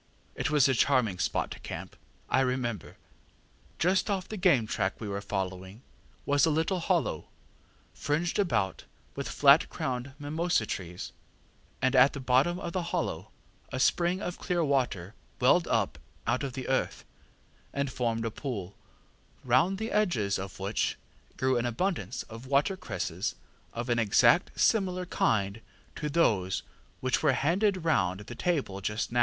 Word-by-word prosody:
It - - -2
was 145 -2 +5
a 135 - +3
charming 115 -7 +2
spot - - -1
to - - -7
camp, - - -7 0.3
I - - +2
remember. 125 -6 -2 0.8
Just 185 +5 +2
off 190 -2 -1
the 215 - -6
game 175 - +3
track 95 -2 -2
we 110 - -5
were 100 0 -3
following 95 +2 -4 0.4
was 145 0 +3
a 165 - +5
little 160 +4 +1
hollow, - - 0 0.7
fringed 160 +6 -1
about 105 - 0 0.3
with - - -4
flat - - +5
crowned 130 +1 -3
mimosa 155 -2 0
trees, 90 -3 -5 0.7
and 130 +1 +3
at 130 +2 +6
the 140 - -5
bottom 135 +7 +2
of 170 - -5
the 185 - 0
hollow, - - -2 0.4
a 130 - -3
spring 175 +7 +2
of 175 - -4
clear 175 -2 0
water 120 - 0 0.3
welled - - +4
up - - 0 0.3
out 120 +2 +1
of 135 -3 -3
the 130 0 -5
earth, 130 - -1 0.7
and 140 -1 -2
formed 115 -2 -1
a 115 - -2
pool, 105 -8 -5 0.7
round 130 +10 +3
the 220 +2 -4
edges 125 - +1
of 95 -1 -7
which 100 +2 -1 0.4
grew 130 -1 +2
an 120 - -1
abundance 125 - -2
of 115 +3 -11
watercresses 145 - -1 0.4
of 120 +1 -4
an 120 -1 +1
exactly 115 - +4
similar 185 -4 +2
kind 105 - 0 0.3
to 150 - -3
those 105 - +2 0.4
which - - +1
were - - +4
handed 185 +4 +1
round 95 - +1
the 105 - -8
table 130 - -1
just 105 +4 -2
now. 120 - +1
130 Hz, 155 wpm, -29 LUFS, 110-170 Hz, 0.8 s, at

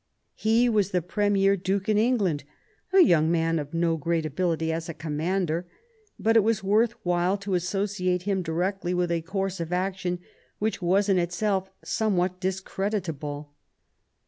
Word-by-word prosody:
He 225 +3 +2
was 210 -4 +2
the 180 -2 0
premier 200 +1 +2
Duke 195 +1 -2
in 210 -1 +3
England, 210 - +1 0.5
a 385 0 +7
young 160 - +5
man 165 -1 +1
of 145 -1 -6
no 165 -1 +1
great 165 +1 -1
ability 160 +1 -1
as 165 +1 -4
a 165 - -5
commander; 165 +3 -1 0.5
but 225 +1 +2
it - - +8
was 220 -1 +1
worth 215 +4 +3
while 175 +2 +1
to 200 -1 -4
associate 185 0 0
him 195 -1 0
directly 180 +2 -1
with 180 -1 0
a 170 -1 0
course 190 +2 -3
of 165 0 -4
action 180 0 -1 0.4
which 215 -1 -2
was 190 +3 +2
in 195 -2 +3
itself 190 +2 -1
somewhat 185 -4 0
discreditable. 180 -6 -3
185 Hz, 155 wpm, -26 LUFS, 170-200 Hz, 0.5 s, it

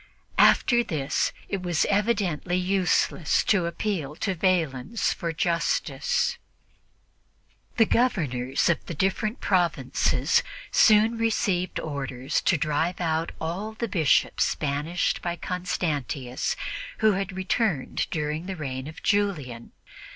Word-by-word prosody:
After 240 -1 +5
this, 150 -9 -1 0.2
it 195 - -3
was 175 -3 +1
evidently 200 -5 0
useless 185 -4 +1
to 185 -5 +2
appeal 170 -5 -3
to 195 - -1
Valens 170 - 0
for 170 -2 -3
justice. 485 - 0 1.4
The 225 - +6
Governors 140 - +1
of 170 - +1
the 170 - -5
different 195 - -1
provinces 175 -8 +2 0.3
soon 220 +2 +5
received 200 -5 0
orders 135 -4 -3
to 175 - +4
drive 160 +3 -1
out 165 -1 -1
all 190 +7 -4
the 230 +2 -3
Bishops 165 -8 +2
banished 150 +4 -1
by 175 -1 -2
Constantius 155 -9 -2 0.4
who 220 -1 +4
had 195 0 -2
returned 190 - 0
during 155 +2 -3
the 190 - -4
reign 135 -4 -5
of 160 - -10
Julian. 155 - -1
175 Hz, 115 wpm, -26 LUFS, 150-200 Hz, 1.4 s, The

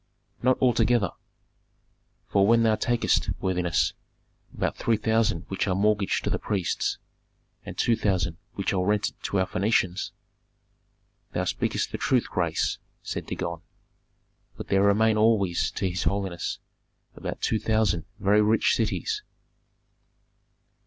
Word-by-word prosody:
"Not 130 +1 +3
altogether! 120 -5 +3 1.2
For 100 -1 +3
when 115 +1 +5
thou 110 -1 +4
takest, 120 +2 +1
worthiness, 90 -3 +1 0.6
about - - -2
three 115 -2 +1
thousand 110 -6 +1
which 95 - -2
are 95 - +1
mortgaged 105 0 +1
to - - -1
the - - 0
priests, 100 -5 -1 0.7
and - - -8
two 115 - +3
thousand 95 -6 0 0.2
which 100 - -1
are 90 -1 +1
rented 105 +2 +1
to 100 - 0
our 95 - +2
Phœnicians 95 -1 0 0.6
" - - -44
"Thou - - 0
speakest - - -1
the - - -4
truth, 125 -3 +2
grace," 85 -3 0 0.2
said - - -5
Dagon. 85 -1 -4 1.0
"But - - -8
there 95 - +3
remain 110 +2 +4
always 105 -5 +2
to 95 - -2
his 90 0 -2
holiness 95 -3 -2 0.6
about - - -5
two 110 - 0
thousand 110 -8 +1
very 105 +2 +3
rich 110 +1 +3
cities." 430 -2 -1
100 Hz, 130 wpm, -26 LUFS, 95-110 Hz, 1.2 s, when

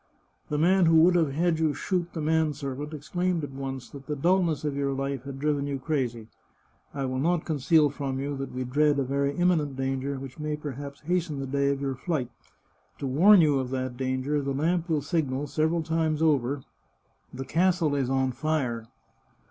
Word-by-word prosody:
The 150 - -1
man 180 +3 +4
who 165 - +5
would 175 +2 +6
have 160 -6 +2
had 165 +1 +1
you 155 -3 +1
shoot 175 +2 -2
the 160 - -3
man 160 0 +2
servant 140 +1 -5
exclaimed 175 +3 -2
at 145 - -5
once 135 -1 -5
that 140 -1 -11
the 150 - -2
dulness 170 0 +1
of 145 -2 -1
your 140 -1 0
life 135 -1 -3
had 140 -1 -6
driven 145 0 0
you 140 -1 -2
crazy. 130 -6 -2 0.6
I 140 -1 -3
will 130 0 -2
not 170 +3 +1
conceal 150 -1 +3
from 135 -2 -3
you 140 +1 -3
that 135 0 -5
we 130 0 -3
dread 145 +3 +2
a 140 - +2
very 140 +2 0
imminent 165 -5 +1
danger, 135 +1 -2
which 130 +2 -9
may 150 0 -2
perhaps 140 -1 -7
hasten 170 -2 -1
the 135 - -3
day 140 +1 +1
of 140 0 -1
your 135 -1 -1
flight. 130 -2 -3 0.7
To - - -5
warn 175 +9 +6
you 145 -4 +3
of 130 -1 -3
that 130 -1 -3
danger, 130 +3 -1
the 140 -1 -2
lamp 170 +4 0
will 155 -3 +1
signal 145 -3 -1
several 160 +3 0
times 160 -1 0
over: 140 -3 +1 0.2
" - - -43
* - - -41
The 135 +1 -6
castle 170 0 +2
is 135 -3 0
on 130 -1 +1
fire. 125 -6 -2
145 Hz, 205 wpm, -27 LUFS, 135-160 Hz, 0.7 s, would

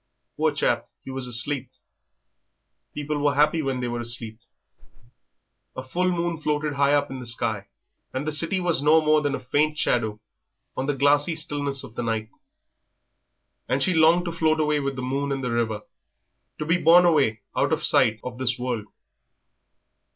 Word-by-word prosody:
Poor - - +1
chap, - - 0 0.2
he 135 - -6
was 130 -1 -3
asleep. 125 +3 0 1.3
People 150 0 -3
were 145 0 +1
happy 150 +3 +3
when 135 -3 -2
they 125 - -2
were 120 0 -3
asleep. 115 -2 -4 1.4
A 130 - -5
full 180 +8 -1
moon 170 -2 -2
floated 150 0 -1
high 140 0 +2
up 145 -1 +1
in 135 - -6
the 125 - -8
sky, 110 -3 -2 0.4
and 130 +3 -4
the 155 - -1
city 165 +5 +1
was 175 -6 +1
no 155 +2 +5
more 155 -1 +3
than 145 -1 -1
a - - -5
faint 150 +4 0
shadow 110 -6 0 0.6
on 130 - -3
the 145 - 0
glassy 145 +4 +2
stillness 145 -3 -2
of - - -11
the 120 - -4
night; 110 -2 -3 1.4
and 135 +2 +1
she 185 - +2
longed 165 +2 +4
to 170 - -2
float 160 -1 +1
away 150 -1 +1
with 140 -1 -3
the 130 - -5
moon 140 +2 -2
and 135 -1 -2
the 125 - -2
river, 110 -2 -1 0.7
to 150 - -4
be 170 +3 +2
borne 175 +2 +6
away 135 -11 +2
out - - +1
of - - +1
sight 110 -1 +4
of 125 0 -7
this 120 -2 0
world. 120 -4 -3
140 Hz, 180 wpm, -24 LUFS, 125-155 Hz, 1.4 s, borne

